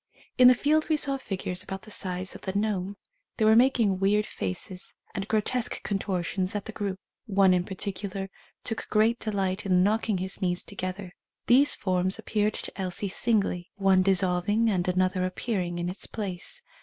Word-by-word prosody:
In 250 - +9
the 250 - +8
field 310 +5 +2
we 310 - +3
saw 275 -2 0
figures 185 -7 -4
about 195 -1 -6
the 215 - -12
size 185 -1 -3
of - - -10
the 190 0 -4
gnome. 200 -2 -1 0.4
They 220 - +2
were 220 0 +6
making 230 -6 +4
weird 205 +2 +2
faces 180 - -4 0.2
and 195 +1 -4
grotesque 225 +3 0
con 200 -2 -1
tortions 185 0 -2
at 205 - -3
the - - -6
group. 200 -3 -3 0.3
One 195 -2 +4
in 180 -1 +1
particular 195 0 -4 0.3
took 225 - -4
great 225 +2 +3
delight 195 -2 -1
in 180 -2 +3
knocking 215 0 +1
his 190 +2 -3
knees 180 -1 0
to - - -11
gether. 185 0 -4 0.3
These 270 +4 +5
forms 185 0 0
appeared 210 -1 0
to 195 - -4
Elsie 190 +2 -2
singly 195 -4 0
— - - -61
one 195 -1 +4
dissolving 195 +4 +2
and 180 -2 0
another 185 0 +1
appear 190 +3 -1
ing 175 -1 -4
in 175 0 -2
its 180 +3 -4
place. 205 - -4
195 Hz, 185 wpm, -27 LUFS, 185-215 Hz, 0.4 s, In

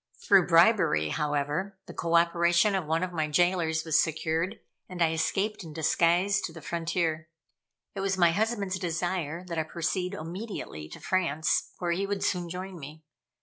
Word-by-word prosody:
Through 195 -3 +5
bribery, 165 - +4
however, 150 - -2
the - - -10
co 170 0 -1
operation 170 +3 +3
of 185 -5 -1
one 165 +2 +1
of 180 -1 -4
my 155 -2 0
jailors 165 0 +1
was 160 -1 +4
secured, 160 +5 -2 0.3
and 180 -1 -8
I 165 -2 +3
escaped 195 +6 -1
in 160 -2 -9
disguise 175 +5 +2
to 170 - -4
the 165 - -10
frontier. 160 0 -2 0.6
It 200 - -6
was 195 0 0
my 170 -2 +5
husband's 200 -1 -1
desire 175 -1 -2
that 170 -2 -3
I - - +1
proceed 180 +4 -2
immediately 165 - -6
to - - -10
France, 165 -5 0
where 175 -1 -2
he 195 +3 -1
would 200 -1 -2
soon 175 -2 -1
join 185 +1 -6
me. 155 +2 -10
170 Hz, 170 wpm, -28 LUFS, 160-185 Hz, 0.6 s, Through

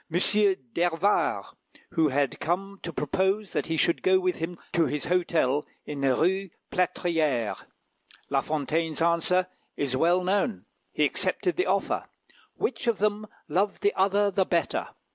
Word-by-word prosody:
d'Hervart, 175 - +1 0.4
who 160 -1 +3
had 140 -1 0
come 195 +4 -2
to 170 - -5
propose 190 +7 0
that - - -1
he 165 0 -1
should 170 - +2
go 185 0 +4
with 185 -1 0
him 165 +2 -4 0.2
to 165 -2 +3
his 150 - -3
hotel 165 -5 +1 0.2
in 145 -2 -5
the 135 -2 +3
Rue 190 +5 +1 0.2
Plâtrière. 160 - 0 0.6
La 135 -1 +1
Fontaine's 155 +2 -1
answer 170 +2 +3 0.3
is 140 -3 -1
well 175 +6 +3
known. 205 +5 0 0.3
He - - +2
accepted 360 - 0
the 370 - 0
offer. - - 0 0.5
"Which 430 - -2
of 230 -3 +2
them 210 +1 0 0.2
loved 200 +3 0
the 205 - +3
other 200 +1 +3
the 190 0 +2
better?" 170 -2 0
175 Hz, 145 wpm, -27 LUFS, 155-195 Hz, 0.6 s, go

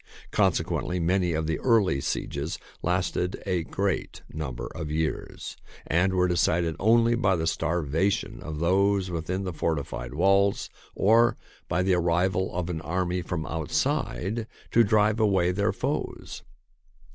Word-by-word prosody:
Conse - - +2
quently, 90 +1 -2
many 90 0 +1
of 80 0 -1
the 80 0 -1
early 105 - +3
sieges 70 +4 -3 0.2
lasted 90 +1 -1
a 90 -3 0
great 95 +3 -2
number 75 -6 -4
of 75 - -5
years 80 0 -3 0.3
and 90 +4 +2
were 90 0 +3
decided 85 -1 +1
only 115 +3 +4
by 105 -6 +2
the 80 -2 -1
starvation 80 +3 0
of 80 -1 -6
those 95 +3 +2
within 85 +3 -2
the 90 -2 -4
fortified 70 -6 -3
walls 100 +3 +2 0.2
or 115 +4 +4 0.3
by 90 +2 +1
the 95 0 +2
arrival 90 +2 +1
of 90 -1 -2
an 85 -3 -3
army 90 +1 -1
from 85 -2 -3
outside 85 - -1 0.2
to 115 - +6
drive 105 +1 +3
away 95 -5 +3
their 100 +3 +1
foes. - - -4
90 Hz, 140 wpm, -26 LUFS, 80-100 Hz, 0.3 s, to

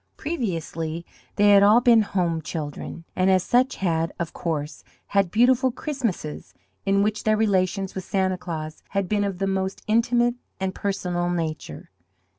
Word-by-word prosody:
Previously 170 - -3 0.3
they 205 0 +5
had 200 -1 +7
all 210 +3 +7
been 240 -2 +5
home 175 -5 -1
children. 155 +1 -6
and 185 +1 +2
as 185 -1 +4
such 255 +2 +2
had, 165 -3 0
of 170 -2 -4
course, 155 -3 -4 0.3
had 200 -3 +2
beautiful 250 +6 +4
Christmases, 235 - -4 0.3
in 200 0 +3
which 210 0 -1
their 215 0 +3
relations 195 -2 +1
with 190 - -5
Santa 185 -1 0
Claus 160 -3 -6 0.2
had 195 -2 +1
been 205 +1 +1
of 195 -2 -2
the 195 - -1
most 190 0 -2
intimate 240 +2 +2 0.3
and 190 -1 -2
personal 180 -3 -2
nature. 160 - -4
190 Hz, 155 wpm, -24 LUFS, 170-215 Hz, 0.3 s, had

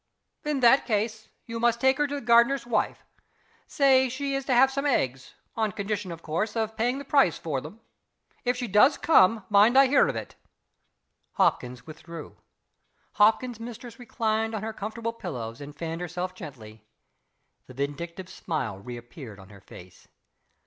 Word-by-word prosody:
"In 300 -3 -1
that 245 +3 +5
case, 220 0 -2 0.2
you 230 0 -5
must 235 0 +2
take 265 +2 +3
her 295 - +2
to 285 - -4
the 285 - -4
gardener's 235 +3 +4
wife. 230 -3 -1 0.6
Say 265 -3 +3
she 275 +2 -3
is 275 -1 -2
to 265 - +1
have 265 +2 +5
some 275 +2 -1
eggs 135 - -1 0.2
on 220 -2 0
condition, 200 -1 -4
of 165 0 -9
course, 175 +8 -2
of 220 -1 -2
paying 245 +4 0
the 280 - -7
price 275 - +3
for 145 -5 -3
them. 160 - -11 0.6
If 245 0 0
she 245 - -3
does 210 +8 +5
come, 220 - +4
mind 210 +5 +5
I 275 - +8
hear 270 +2 +4
of - - -2
it." - - -6 1.0
Hopkins 125 0 0
withdrew. 165 +1 -10 0.9
Hopkins's 225 +2 +3
mistress 235 +1 -9
reclined 225 -2 -1
on 215 - -4
her 220 0 -4
comfortable 220 +2 -5
pillows 125 - -6
and 145 +1 -9
fanned 165 +2 -5
herself 180 +1 -4
gently. 115 - -11 0.8
The 130 - -13
vindictive 170 +7 -5
smile 135 - -4
reappeared 120 +1 -10
on 95 0 -14
her 100 -2 -15
face. 90 -2 -15
215 Hz, 165 wpm, -26 LUFS, 160-245 Hz, 1.0 s, I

